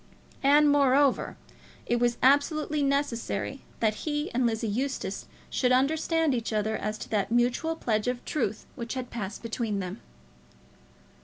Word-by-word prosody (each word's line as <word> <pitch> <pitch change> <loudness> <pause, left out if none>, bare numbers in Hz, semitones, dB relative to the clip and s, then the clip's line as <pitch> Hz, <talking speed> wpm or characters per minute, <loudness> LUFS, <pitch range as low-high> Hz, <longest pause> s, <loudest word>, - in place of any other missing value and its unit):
And, 290 +2 +5
moreover, 280 -1 +3 0.5
it 240 - +1
was 240 0 +1
absolutely 295 +2 +3
necessary 275 -3 -1 0.2
that 215 -2 +2
he 295 0 -2
and 245 0 +2
Lizzie 225 0 -1
Eustace 215 -3 -3 0.2
should 250 -1 +1
understand 315 +3 +2
each 230 -2 -2
other 215 0 0
as 215 0 -3
to - - -8
that 210 -1 0
mutual 245 +7 +1
pledge 215 -7 -1
of 250 0 -2
truth 230 -8 -2
which 235 0 -5
had 255 -1 -5
passed 210 -2 -5
between 225 -2 -2
them. 185 -1 -5
250 Hz, 145 wpm, -28 LUFS, 220-285 Hz, 0.5 s, And